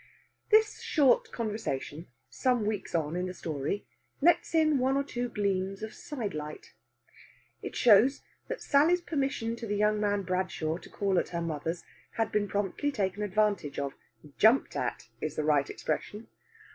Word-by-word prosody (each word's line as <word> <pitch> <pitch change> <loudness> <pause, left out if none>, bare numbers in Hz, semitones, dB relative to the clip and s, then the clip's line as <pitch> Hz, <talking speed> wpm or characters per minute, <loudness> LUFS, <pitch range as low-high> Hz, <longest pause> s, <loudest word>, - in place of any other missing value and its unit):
This 435 0 +4
short 280 -5 +3
conversation, 205 - -4 0.2
some 230 - 0
weeks 210 -4 -2
on 160 0 0
in 180 +1 -1
the 185 - -6
story, 155 +4 -3 0.3
lets 335 +1 +3
in 310 -3 +4
one 265 +2 +2
or 280 - +1
two 245 -3 -3
gleams 195 -2 -1
of 220 - -5
side 240 -10 -5
light. 150 0 -7 0.9
It - - -6
shows 240 +4 +5 0.2
that - - -5
Sally's 315 +5 +4
permission 270 -8 -1
to 230 - -6
the 205 0 -1
young 210 0 +2
man 205 -1 +1
Bradshaw 180 -4 -1
to - - -14
call 195 -3 +1
at - - -3
her 170 - -3
mother's 165 +1 -3 0.3
had 225 -2 -1
been 210 -1 +1
promptly 205 +9 -1
taken 200 -5 -2
advantage 205 -6 0
of 140 -1 -2 0.5
jumped 225 +5 +4
at - - -3
is 155 -1 -3
the 155 - -1
right 145 -2 +2
expression. 210 +2 -4
205 Hz, 160 wpm, -29 LUFS, 175-250 Hz, 0.9 s, shows